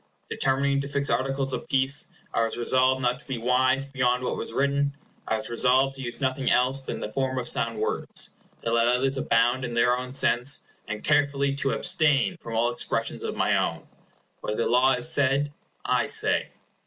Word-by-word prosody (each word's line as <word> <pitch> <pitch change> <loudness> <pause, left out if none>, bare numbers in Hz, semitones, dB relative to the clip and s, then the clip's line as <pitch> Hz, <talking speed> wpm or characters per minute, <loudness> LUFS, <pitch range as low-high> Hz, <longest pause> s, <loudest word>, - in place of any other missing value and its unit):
Determining 140 +1 +1
to 140 - -5
fix 140 0 -1
articles 135 0 0
of - - -5
peace, 135 +1 +2 0.3
I - - +1
was 115 - -4
resolved 130 +2 +2
not 125 +1 0
to - - -21
be 130 -3 -3
wise 130 +3 +1
beyond 125 -2 0
what - - -2
was - - -5
written; 140 +2 0 0.3
I 110 - 0
was 110 - -7
resolved 130 +3 +2
to 135 - -7
use 120 -2 -6
nothing 130 -1 -1
else 130 +2 +2
than 130 - -6
the - - -5
form 130 0 -1
of 125 -1 -2
sound 115 -2 +1
words, 110 - -1 0.3
to 115 - -1
let 115 0 +3
others 130 +2 +1
abound 120 0 +1
in 120 -1 -4
their 125 +1 +3
own 125 0 -6
sense, 135 0 +2 0.3
and 105 +1 -5
carefully 140 -2 +1
to 135 -2 0
abstain 160 +3 +2
from 115 - -6
all 120 +1 +2
expressions 120 - -2
of - - -4
my - - +1
own. - - -2 0.5
What 105 - -4
the - - 0
law 130 +2 +3
has 125 +6 0
said, 140 +1 +1 0.3
I - - +1
say. - - +2
130 Hz, 195 wpm, -25 LUFS, 120-140 Hz, 0.5 s, let